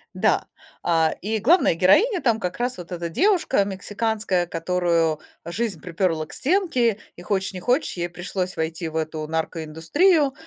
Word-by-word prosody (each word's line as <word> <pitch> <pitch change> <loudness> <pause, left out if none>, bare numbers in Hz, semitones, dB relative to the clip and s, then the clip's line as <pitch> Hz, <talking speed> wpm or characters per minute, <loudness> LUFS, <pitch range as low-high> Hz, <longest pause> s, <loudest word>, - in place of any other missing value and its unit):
Да. - - +2 0.4
А, 165 -2 +2
и 220 +3 -1
главная 315 - +4
героиня 340 - +4
там 230 -3 +2
как 180 -3 -3
раз 245 -1 -2
вот 180 +1 -10
эта 170 -1 -3
девушка 360 - +2
мексиканская, 205 -1 -1
которую 165 -2 0 0.3
жизнь 195 +1 -3
припёрла 165 -1 -1
к - - -13
стенке, 270 - +1 0.2
и, - - -11
хочешь 190 +1 -1
не 185 - -5
хочешь, 250 - +1
ей 175 0 -2
пришлось 180 +1 -4
войти 160 +1 -2
в 160 - -11
эту 155 -1 -3
наркоиндустрию. 165 - +1
185 Hz, 155 wpm, -23 LUFS, 165-235 Hz, 0.4 s, главная